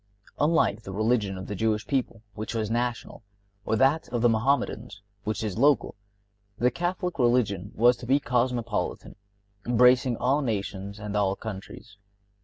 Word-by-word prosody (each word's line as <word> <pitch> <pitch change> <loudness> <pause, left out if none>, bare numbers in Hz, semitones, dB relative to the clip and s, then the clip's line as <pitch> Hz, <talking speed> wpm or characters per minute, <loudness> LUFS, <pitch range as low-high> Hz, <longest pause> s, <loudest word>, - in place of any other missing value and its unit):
Unlike 150 -9 +2
the 95 - -8
religion 105 -1 0
of 95 - -7
the 105 - -5
Jewish 110 +1 0
people, 125 -5 -2
which 110 +2 -5
was 110 -1 -2
national, 120 0 -2 0.4
or 110 - +1
that 135 +7 +2
of 120 -1 -2
the 120 - +6
Mohammedans, 115 -2 -1 0.2
which 110 0 -2
is 105 -1 -3
local, 140 -3 +3 0.6
the 125 +1 +2
Catholic 175 +4 -3
religion 110 -6 +1
was 120 +2 +4
to 120 - -10
be 135 +3 +4
cosmopolitan, 125 -2 -2 0.5
embracing 125 0 +4
all 135 +4 +1
nations 100 -4 -3
and 105 0 -6
all 100 -2 +1
countries. 100 0 -9
115 Hz, 150 wpm, -26 LUFS, 105-125 Hz, 0.6 s, the